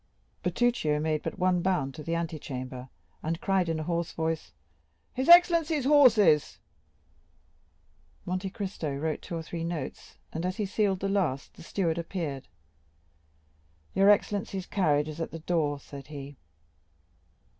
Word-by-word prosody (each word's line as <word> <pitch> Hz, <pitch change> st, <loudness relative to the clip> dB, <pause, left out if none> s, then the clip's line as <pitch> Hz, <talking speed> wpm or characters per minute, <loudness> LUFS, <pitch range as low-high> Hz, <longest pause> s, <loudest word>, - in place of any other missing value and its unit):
Bertuccio 180 Hz, -5 st, +1 dB
made 155 Hz, 0 st, 0 dB
but -, -, -5 dB
one 180 Hz, -1 st, +2 dB
bound 170 Hz, -7 st, 0 dB
to 155 Hz, -, -8 dB
the 165 Hz, +3 st, -2 dB
antechamber, 130 Hz, -6 st, -5 dB, 0.3 s
and 165 Hz, +1 st, -2 dB
cried 190 Hz, -3 st, +1 dB
in 160 Hz, -1 st, -1 dB
a -, -, -3 dB
hoarse 170 Hz, +1 st, -2 dB
voice: 160 Hz, -1 st, -2 dB, 0.6 s
"His 260 Hz, +5 st, -1 dB
excellency's 335 Hz, -4 st, +6 dB
horses!" 220 Hz, -, +5 dB, 1.7 s
Monte 185 Hz, +2 st, -2 dB
Cristo 185 Hz, -8 st, -4 dB
wrote 155 Hz, +1 st, -2 dB
two 170 Hz, -, -6 dB
or 165 Hz, -, -5 dB
three 165 Hz, 0 st, -5 dB
notes, 165 Hz, -5 st, -5 dB, 0.2 s
and, 165 Hz, -, -3 dB
as 185 Hz, +1 st, -2 dB
he 210 Hz, -, 0 dB
sealed 195 Hz, -1 st, 0 dB
the 195 Hz, -, 0 dB
last, 180 Hz, -9 st, -1 dB
the -, -, -14 dB
steward 170 Hz, 0 st, -1 dB
appeared. 165 Hz, -6 st, -4 dB, 1.5 s
"Your 195 Hz, +1 st, +5 dB
excellency's 200 Hz, -2 st, +1 dB
carriage 150 Hz, -8 st, +1 dB
is 155 Hz, +1 st, -6 dB
at -, -, -2 dB
the 165 Hz, -, -7 dB
door," 155 Hz, -3 st, 0 dB
said 140 Hz, 0 st, -11 dB
he. 145 Hz, -1 st, -8 dB
170 Hz, 145 wpm, -28 LUFS, 155-195 Hz, 1.7 s, excellency's